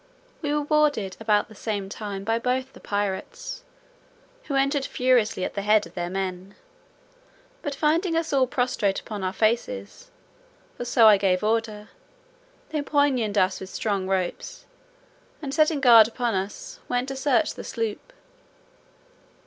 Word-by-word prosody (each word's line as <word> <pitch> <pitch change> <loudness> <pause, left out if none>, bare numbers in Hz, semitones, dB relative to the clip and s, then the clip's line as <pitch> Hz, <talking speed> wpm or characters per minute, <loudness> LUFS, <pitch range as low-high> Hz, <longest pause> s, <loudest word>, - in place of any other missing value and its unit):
We 295 -3 -2
were 295 0 0
boarded 290 -11 +1
about 215 -2 +2
the 215 - -14
same 205 -2 -4
time 200 -1 -6
by 225 +2 0
both 255 +2 -1
the - - -14
pirates, 205 - -4 0.8
who 280 - -3
entered 275 +1 +1
furiously 250 -7 +1
at - - -5
the 200 - -3
head 210 +1 +3
of - - -14
their 175 -1 -3
men; 190 0 -4 1.1
but 285 -1 -4
finding 325 +4 +1
us 325 -2 -1
all 265 -2 +3
prostrate 245 -7 0
upon 210 -4 -7
our 185 - 0
faces 240 - -2 0.7
(for 245 - -5
so 235 -1 +5
I 210 -2 +8
gave 190 -1 +1
order), 215 -1 -1 0.8
they 305 -2 -2
pinioned 270 -8 +1
us 185 0 +2
with 190 - -8
strong 200 -3 -2
ropes, 190 -2 -3 0.7
and 280 -3 -5
setting 310 -1 +3
guard 235 -5 +8
upon 235 0 -2
us, 195 +2 -5
went 245 +1 0
to 270 - -4
search 275 +2 +1
the - - -8
sloop. 225 - -4
230 Hz, 150 wpm, -25 LUFS, 205-280 Hz, 1.1 s, I